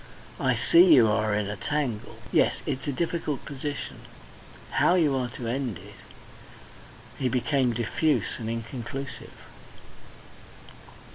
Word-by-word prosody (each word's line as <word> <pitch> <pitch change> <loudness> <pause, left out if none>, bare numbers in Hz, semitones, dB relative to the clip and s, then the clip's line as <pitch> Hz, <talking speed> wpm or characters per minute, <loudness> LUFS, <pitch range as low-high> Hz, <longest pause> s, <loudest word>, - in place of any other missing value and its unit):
"I - - +2
see 170 -1 +6
you 120 -4 +6
are 105 0 +1
in 105 -1 -1
a 105 - -4
tangle. 130 -2 -3
Yes, - - +2
it's 130 +3 -3
a - - +1
difficult 160 -2 -2
position. 145 0 -5 0.7
How 175 - +3
you 155 -6 +3
are 125 -2 -1
to 120 - -5
end 120 -4 -2
it..." - - -13 1.3
He 130 - +1
became 130 +1 +1
diffuse 120 +8 0
and 110 -1 -4
inconclusive. 120 +4 -6
130 Hz, 125 wpm, -27 LUFS, 115-145 Hz, 1.3 s, see